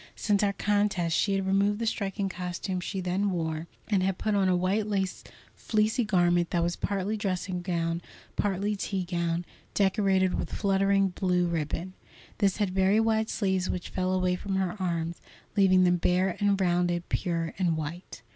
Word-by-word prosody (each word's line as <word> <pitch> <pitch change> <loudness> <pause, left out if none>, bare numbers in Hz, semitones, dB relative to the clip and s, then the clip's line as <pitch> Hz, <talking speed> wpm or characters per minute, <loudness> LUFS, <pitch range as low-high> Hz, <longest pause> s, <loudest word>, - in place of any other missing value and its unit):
Since 205 -2 +1
our 200 -1 +2
contest 200 -5 +1
she 200 -2 +2
had 195 -1 -1
removed 200 +2 +2
the 230 - -2
striking 200 -2 -1
costume 180 0 -4
she 190 +1 -4
then 185 +3 0
wore, 160 -2 -2 0.2
and 200 -4 +2
had 190 0 0
put 215 - -1
on 195 -2 +3
a 180 - +3
white 190 +4 +1
lace 195 -3 -2 0.3
fleecy 220 +3 +1
garment 175 -4 +2
that 170 -1 +1
was 175 0 0
partly 200 +1 -2
dressing 185 -3 -2
gown, 170 -2 -1 0.3
partly 205 +1 0
tea 195 -1 -2
gown, 170 -1 -1 0.3
decorated 190 -2 +2
with - - -3
fluttering 195 -1 +2
blue 180 -1 +1
ribbon. 170 +2 -2 0.5
This 200 -3 +2
had 205 -3 0
very 190 +3 +3
wide 220 -1 +1
sleeves 190 -3 0
which 180 - -3
fell 185 0 -1
away 185 -1 +1
from 195 +1 -3
her 190 -1 0
arms, 170 -2 -2 0.3
leaving 185 -2 +5
them 180 0 +4
bare 180 +1 +1
and 200 -1 +2
rounded, 175 -1 +1
pure 170 -3 -1
and 170 -4 +1
white. 160 +1 -6
185 Hz, 175 wpm, -28 LUFS, 175-200 Hz, 0.5 s, leaving